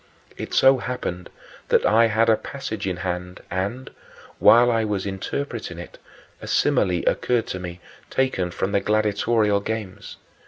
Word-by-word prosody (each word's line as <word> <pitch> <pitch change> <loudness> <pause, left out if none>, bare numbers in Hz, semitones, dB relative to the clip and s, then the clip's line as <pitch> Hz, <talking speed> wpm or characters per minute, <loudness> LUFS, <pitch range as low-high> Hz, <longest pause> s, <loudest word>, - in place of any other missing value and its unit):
It - - -7
so 135 0 +6
happened 105 -9 -5 0.4
that - - +3
I 115 +2 +5
had 110 +1 +2
a 110 - +5
passage 110 -6 -6
in 90 -2 -2
hand 90 0 -4
and, 100 +8 -3 0.5
while 120 +1 +6
I 115 -1 +1
was 105 -3 -2
interpreting 100 0 -4
it, 85 - -10 0.4
a - - -8
simile 90 -2 +1
occurred 120 -2 +1
to 95 - -4
me, 90 -1 -7 0.3
taken 130 -9 0
from 95 +3 -3
the 100 - +2
gladiatorial 105 0 +1
games. 105 -2 -6
105 Hz, 150 wpm, -23 LUFS, 95-115 Hz, 0.5 s, so